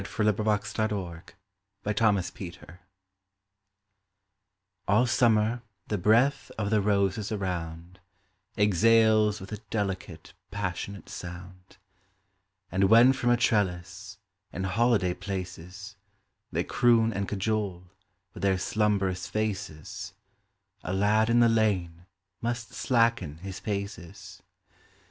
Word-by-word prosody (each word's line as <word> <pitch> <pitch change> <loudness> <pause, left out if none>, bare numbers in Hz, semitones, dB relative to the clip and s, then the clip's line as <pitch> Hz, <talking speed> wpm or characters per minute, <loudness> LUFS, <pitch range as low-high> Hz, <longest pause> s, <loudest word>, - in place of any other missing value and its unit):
The 105 +2 0
Japanese 105 0 -1 1.1
Anemone 95 -4 -1 2.1
ALL 105 +5 +4
summer 115 -1 +2 0.3
the 105 - 0
breath 120 +9 +3
of 105 -1 -2
the 110 -1 +3
roses 100 0 0
around 90 -3 -4 0.6
Exhales 110 +1 +4
with 95 - -10
a 105 - -4
delicate, 100 -4 -4 0.2
passionate 100 0 -5
sound; 90 +1 -10 0.9
And 95 +1 +2
when 115 +6 +7
from 130 -2 -1
a 120 - +4
trellis, 95 -4 -1 0.3
in 95 - -4
holiday 100 -1 +2
places, 95 +2 -7 0.5
They - - 0
croon 115 -2 +3
and 100 0 -2
cajole, 100 -3 -2 0.5
with - - -10
their 95 -1 +2
slumberous 95 -1 0
faces, 100 -7 -4 0.7
A 90 - -3
lad 105 +3 +2
in 120 +1 +4
the 120 - +6
lane 95 -6 0 0.3
must 120 0 -3
slacken 115 - +1
his 95 +2 -7
paces. 100 -4 -6
100 Hz, 100 wpm, -28 LUFS, 95-110 Hz, 2.1 s, when